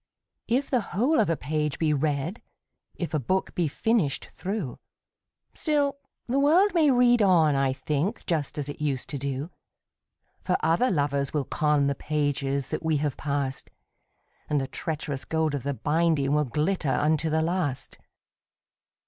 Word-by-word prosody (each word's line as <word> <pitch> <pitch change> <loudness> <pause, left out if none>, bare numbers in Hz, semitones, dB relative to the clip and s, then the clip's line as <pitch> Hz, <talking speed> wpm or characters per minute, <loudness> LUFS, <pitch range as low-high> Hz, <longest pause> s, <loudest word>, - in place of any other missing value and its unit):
II. 235 - +4
If 275 - -4
the 250 -3 +3
whole 240 - +1
of 215 - +3
a 165 - +1
page 150 +1 -2
be 155 -2 +2
read, 150 - -1 0.5
If 170 - -4
a 155 - +2
book 185 +9 -1
be 175 -3 +1
finished 180 -2 0
through, 190 - -5 0.7
Still 290 -3 0 0.3
the 260 +3 0
world 340 +9 +4
may 320 -4 +4
read 245 -2 +4
on, 170 -7 +5
I 135 -1 +2
think, 150 - -2
Just 155 -2 -1
as 145 -2 -3
it 145 - -7
used 140 -4 -1
to 140 - -4
do; 140 +4 -3 0.9
For 180 - +1
other 165 +11 +3
lovers 140 - 0
will 145 -3 0
con 150 0 +1
The 140 - +1
pages 140 -2 -1
that - - -3
we 160 -2 +2
have 145 -2 -1
passed, 140 -2 -3 0.8
And 150 - +2
the 135 - -2
treacherous 150 -3 -4
gold 160 -2 0
of 140 - -2
the 140 +2 -2
binding 150 -1 +1
Will 150 0 +2
glitter 150 +4 -1
unto 155 +4 +1
the 160 +1 +1
last. 160 -6 -2
155 Hz, 165 wpm, -26 LUFS, 140-185 Hz, 0.9 s, on